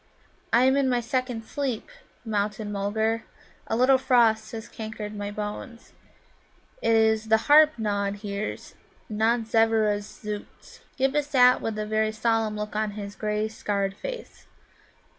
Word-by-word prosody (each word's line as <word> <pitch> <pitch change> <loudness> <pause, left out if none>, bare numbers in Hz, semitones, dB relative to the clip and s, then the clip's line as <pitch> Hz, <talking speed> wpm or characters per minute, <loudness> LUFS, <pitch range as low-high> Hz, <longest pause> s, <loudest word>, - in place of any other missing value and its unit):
"I 235 +2 +5
am 265 +1 +4
in 275 -2 +2
my 245 -1 +2
second 245 -1 -2
sleep, 265 -3 -3 0.4
Mountain 210 0 -2
mulgar. 220 +3 -1 0.4
A - - -1
little 260 +2 +4
frost 225 -4 +3
has 225 -1 -7
cankered 215 -1 -7
my 205 0 -4
bones. 210 +3 -7 0.9
It 230 - +2
is 220 0 +3
the 220 0 +5
Harp 305 0 +6
Nod 205 -2 -1
hears, 205 0 -5 0.4
not 225 +2 +1
Zevvera's 220 -2 +1
zōōts." 210 -1 -8 0.2
Ghibba 270 +2 +2
sat 250 -3 +4
with 220 -1 -3
a 215 - -2
very 215 0 +1
solemn 220 -1 0
look 210 0 -5
on 215 -1 -1
his 200 -1 -6
grey 210 0 -1
scarred 200 -3 -2
face. - - -8
220 Hz, 140 wpm, -26 LUFS, 210-240 Hz, 0.9 s, Harp